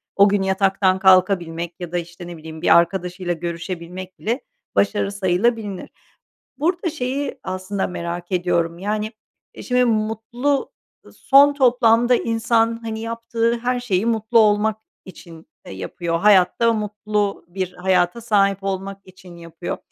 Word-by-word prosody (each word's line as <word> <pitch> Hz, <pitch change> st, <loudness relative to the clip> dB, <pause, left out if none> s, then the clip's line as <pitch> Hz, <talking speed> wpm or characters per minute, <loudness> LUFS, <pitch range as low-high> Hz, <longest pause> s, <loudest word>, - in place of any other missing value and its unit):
o 200 Hz, +1 st, +6 dB
gün 200 Hz, 0 st, +1 dB
yataktan 190 Hz, 0 st, +1 dB
kalkabilmek 180 Hz, -3 st, +2 dB
ya 175 Hz, -2 st, -7 dB
da, 175 Hz, -, -1 dB
işte, 175 Hz, +1 st, -7 dB
ne 175 Hz, -1 st, -8 dB
bileyim, 160 Hz, 0 st, -10 dB
bir -, -, +6 dB
arkadaşıyla 180 Hz, +1 st, 0 dB
görüşebilmek 175 Hz, +2 st, -6 dB
bile 235 Hz, +5 st, -2 dB, 0.3 s
başarı 200 Hz, 0 st, +1 dB
sayılabilinir. 200 Hz, +1 st, -1 dB, 0.7 s
Burada 345 Hz, +3 st, 0 dB
şeyi 275 Hz, -1 st, -3 dB
aslında 185 Hz, +1 st, -3 dB
merak 175 Hz, 0 st, -6 dB
ediyorum, 170 Hz, -2 st, 0 dB
yani, 210 Hz, +3 st, -2 dB, 0.4 s
e, -, -, -9 dB
şimdi 250 Hz, 0 st, +2 dB
mutlu 225 Hz, +5 st, -1 dB, 0.5 s
son 285 Hz, +1 st, +5 dB
toplamda 245 Hz, -2 st, +4 dB
insan, 230 Hz, 0 st, +1 dB
hani, 220 Hz, -1 st, -4 dB
yaptığı 230 Hz, +1 st, -1 dB
her 245 Hz, +1 st, -1 dB
şeyi 215 Hz, -3 st, 0 dB
mutlu 225 Hz, 0 st, +2 dB
olmak 210 Hz, 0 st, +3 dB, 0.3 s
için, 170 Hz, -3 st, -13 dB, 0.2 s
eee, -, -, -8 dB
yapıyor, 165 Hz, -, -3 dB
hayatta 205 Hz, +4 st, +4 dB
mutlu 210 Hz, -2 st, -2 dB
bir 185 Hz, 0 st, -4 dB
hayata 180 Hz, +3 st, +1 dB
sahip 200 Hz, -3 st, +1 dB
olmak 195 Hz, 0 st, -4 dB
için 185 Hz, -1 st, -15 dB
yapıyor. 170 Hz, 0 st, -7 dB
195 Hz, 135 wpm, -21 LUFS, 180-230 Hz, 0.7 s, o